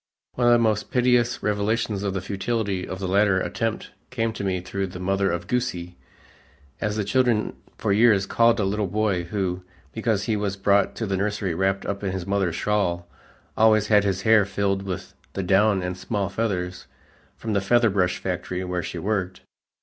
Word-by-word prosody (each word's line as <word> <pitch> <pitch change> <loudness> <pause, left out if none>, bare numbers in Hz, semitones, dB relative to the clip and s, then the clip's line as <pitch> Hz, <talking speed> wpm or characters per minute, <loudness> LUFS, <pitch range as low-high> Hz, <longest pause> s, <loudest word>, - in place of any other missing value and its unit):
One 120 -1 +1
of 120 - +7
the - - +6
most 110 -3 +1
piteous 125 -1 +2
revelations 105 0 0
of 100 -1 -2
the 95 - -1
futility 100 0 -2
of 95 - -5
the 95 0 -4
latter 100 0 +3
attempt 110 +5 -3 0.2
came 115 -2 -1
to 105 - -5
me 95 -2 0
through 95 +2 -3
the 90 0 -9
mother 95 +1 +1
of 85 0 -2
"Goosie," 90 -8 -2 0.8
as 105 -1 -1
the 105 - 0
children 120 0 +1 0.2
for 105 -3 0
years 105 -2 +4
called 115 +3 +3
a - - +2
little 100 +1 0
boy 100 -3 0
who, 90 -1 -2 0.3
because 110 -1 -1
he 110 - 0
was 100 -1 -2
brought 100 0 +2
to 115 - -3
the 95 -2 -1
nursery 100 -2 -1
wrapped 95 +3 0
up 100 0 -4
in 95 -2 -1
his 95 -2 -4
mother's 100 -3 0
shawl, 90 -5 0 0.5
always 110 -1 +4
had 105 -2 +5
his 95 -2 -1
hair 110 -1 +6
filled 100 0 -1
with 95 -2 -6 0.2
the 95 - -3
down 95 +1 +3
and 90 0 -3
small 100 -2 -2
feathers 90 -4 -3 0.5
from 110 -1 -3
the 100 - +2
feather 115 +2 +3
brush 90 -2 +1
factory 90 0 -3
where 90 -1 -2
she 85 - -6
worked. 95 0 -2
100 Hz, 190 wpm, -24 LUFS, 95-110 Hz, 0.8 s, of